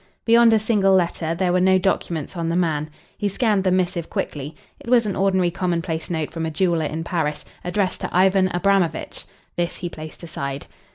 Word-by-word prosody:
Beyond 230 0 +6
a 220 - +5
single 205 -3 +3
letter 170 -2 0
there 180 0 +1
were 180 - +3
no 190 0 +5
documents 180 -3 -1
on 165 -1 -2
the 165 - 0
man. 155 -4 0 0.3
He 205 - 0
scanned 205 -1 +1
the 190 - +2
missive 180 -2 0
quickly. 145 +2 -4 0.2
It - - -10
was 240 -2 +4
an 200 - -2
ordinary 190 -2 +2
commonplace 170 -2 -2
note 160 -3 -2
from 165 - -4
a - - -2
jeweller 165 0 +1
in 160 +2 -4
Paris, 160 -3 -2 0.2
addressed 185 +1 -1
to - - -3
Ivan 190 +1 +3
Abramovitch. 180 -3 0 0.3
This 175 -1 -1
he 175 - -4
placed 155 +1 -10
aside. 140 -4 -5
175 Hz, 190 wpm, -22 LUFS, 165-190 Hz, 0.3 s, Beyond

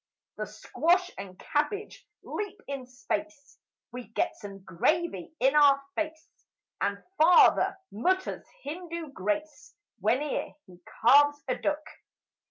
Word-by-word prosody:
The - - -3
squash 360 +2 +1
and 190 -2 -9
cabbage 350 +10 -2 0.2
leap 415 0 -5
in 275 -3 -5
space 285 +3 -5 0.3
We 250 0 -7
get 225 - -1
some 195 -2 -10
gravy 300 - 0
in 265 +3 +3
our 285 -2 +7
face 315 0 -4 0.5
And - - -1 0.2
Father 345 +4 +6
mutters 375 - -1 0.2
Hindu 335 0 -6
grace 270 +9 -3 0.2
Whene'er 250 +9 0
he 180 -2 -17 0.2
carves 290 +4 +6
a 255 - +1
duck. 300 0 -1
290 Hz, 115 wpm, -28 LUFS, 245-325 Hz, 0.5 s, our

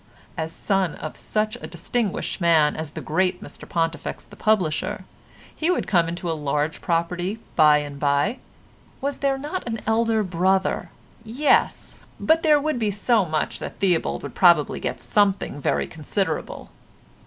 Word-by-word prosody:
As 160 0 -3
son 190 -2 0
of 155 - -7
such 215 0 -2
a - - -8
distinguished 200 +3 -2
man 160 -3 +4
as 160 -1 -4
the - - -7
great 180 +3 0
Mr - - -10
Pontifex 165 -2 -2
the 205 - -15
publisher 190 -8 0 0.5
he 325 - -1
would 365 - +1
come 170 -5 +3
into 175 +1 -5
a 165 - +1
large 150 +1 -1
property 175 +4 -1 0.2
by 150 -2 +6
and 145 -1 -5
by. 145 - +1 0.6
Was 280 +1 -2
there 275 -1 +1
not 295 +3 -5
an 225 -1 -2
elder 225 0 +2
brother? 190 +1 +1 0.3
Yes, 245 +7 +1 0.3
but 325 +1 +3
there 305 -2 +5
would 300 -3 -1
be 215 -2 +1
so 205 +1 +2
much 155 -2 -2
that - - -7
Theobald 180 -4 0
would - - -6
probably 170 -5 +4
get - - -3
something 200 -8 +1
very - - +1
considerable. 160 +1 -3
185 Hz, 155 wpm, -23 LUFS, 160-220 Hz, 0.6 s, by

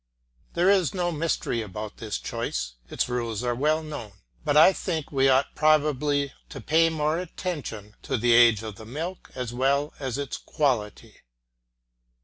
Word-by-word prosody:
There 180 +3 +4
is 190 -3 +2
no 175 -1 0
mystery 155 -7 -1
about 105 0 -7
this 110 -2 -4
choice; - - -4 0.2
its - - -1
rules 120 -2 -2
are 120 0 0
well 155 +5 +1
known, 135 -10 -7 0.3
but 150 -1 +2
I 160 +5 +8
think 165 -5 -3
we 135 -1 +3
ought 135 +1 +3
probably 145 -2 +2 0.2
to - - -8
pay 165 +2 +3
more 155 0 0
attention 150 - -5
to 130 - -2
the 120 +1 +3
age 115 -2 +6
of 110 -3 -7
the 110 - -10
milk 165 +9 -6
as 125 -2 -4
well 140 +4 +1
as 130 -2 -3
its 140 -2 -4
quality. 125 -9 -2
140 Hz, 160 wpm, -26 LUFS, 120-155 Hz, 0.3 s, I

